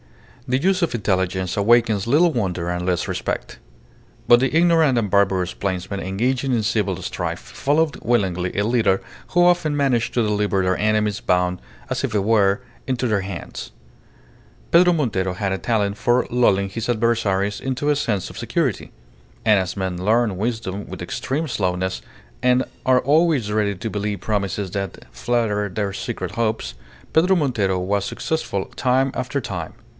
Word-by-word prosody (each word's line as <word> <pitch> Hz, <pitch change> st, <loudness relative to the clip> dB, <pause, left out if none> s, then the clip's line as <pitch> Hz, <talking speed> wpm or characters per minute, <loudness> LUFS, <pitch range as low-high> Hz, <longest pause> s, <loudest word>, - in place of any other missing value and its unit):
The 130 Hz, 0 st, +2 dB
use 185 Hz, +6 st, +1 dB
of 170 Hz, -, 0 dB
intelligence 95 Hz, -4 st, -1 dB
awakens 110 Hz, -1 st, +3 dB
little 160 Hz, +6 st, +4 dB
wonder 90 Hz, -7 st, -1 dB
and 90 Hz, 0 st, -2 dB
less 90 Hz, -2 st, 0 dB
respect. -, -, -4 dB, 0.7 s
But 120 Hz, -, +7 dB
the 135 Hz, -, +1 dB
ignorant 165 Hz, -5 st, +4 dB
and 110 Hz, -4 st, 0 dB
barbarous 95 Hz, -2 st, +2 dB
plainsmen 95 Hz, 0 st, -3 dB
engaging 125 Hz, +8 st, -1 dB
in 115 Hz, -3 st, +1 dB
civil 110 Hz, -2 st, 0 dB
strife -, -, -3 dB
followed 150 Hz, +1 st, 0 dB
willingly 95 Hz, -7 st, 0 dB
a 100 Hz, -, +2 dB
leader 110 Hz, -5 st, +2 dB, 0.3 s
who 175 Hz, 0 st, +4 dB
often 175 Hz, -4 st, +2 dB
managed 130 Hz, -5 st, +1 dB
to 120 Hz, -, +3 dB
deliver 105 Hz, -2 st, +1 dB
their 90 Hz, 0 st, +2 dB
enemies 105 Hz, -1 st, +1 dB
bound, 90 Hz, 0 st, +1 dB, 0.3 s
as 130 Hz, 0 st, -2 dB
it 135 Hz, -, -1 dB
were, 100 Hz, -1 st, +3 dB, 0.3 s
into 130 Hz, -1 st, 0 dB
their 105 Hz, -3 st, +1 dB
hands. 95 Hz, -2 st, -7 dB, 1.0 s
Pedro 180 Hz, +1 st, +6 dB
Montero 100 Hz, -, 0 dB
had 95 Hz, 0 st, -2 dB
a -, -, -1 dB
talent 105 Hz, -3 st, 0 dB
for 120 Hz, +3 st, +2 dB
lulling 100 Hz, -5 st, +3 dB
his 115 Hz, +4 st, -4 dB
adversaries 110 Hz, -4 st, +1 dB
into 135 Hz, +2 st, -1 dB
a 150 Hz, -, +3 dB
sense 105 Hz, -9 st, -1 dB
of -, -, -11 dB
security. -, -, -1 dB, 0.5 s
And 105 Hz, -2 st, +5 dB
as 95 Hz, +1 st, -3 dB
men 95 Hz, -2 st, -3 dB
learn 110 Hz, 0 st, +2 dB
wisdom 105 Hz, -1 st, -3 dB
with -, -, -7 dB
extreme 155 Hz, +5 st, -2 dB
slowness, 95 Hz, -5 st, -1 dB, 0.4 s
and 125 Hz, +1 st, +3 dB, 0.2 s
are 130 Hz, -1 st, +5 dB
always 145 Hz, -5 st, +2 dB
ready 105 Hz, -2 st, +1 dB
to 110 Hz, +5 st, -5 dB
believe 105 Hz, -1 st, -3 dB
promises 100 Hz, -2 st, -2 dB
that 100 Hz, -2 st, -5 dB
flatter 105 Hz, -, 0 dB
their 100 Hz, +1 st, -2 dB
secret -, -, -4 dB
hopes, 110 Hz, -, -2 dB, 0.4 s
Pedro 180 Hz, +4 st, +4 dB
Montero 110 Hz, -, +1 dB
was 100 Hz, +2 st, 0 dB
successful 100 Hz, -7 st, -2 dB
time 130 Hz, +1 st, +2 dB
after 135 Hz, +3 st, -2 dB
time. 90 Hz, -9 st, -5 dB
110 Hz, 160 wpm, -22 LUFS, 95-125 Hz, 1.0 s, But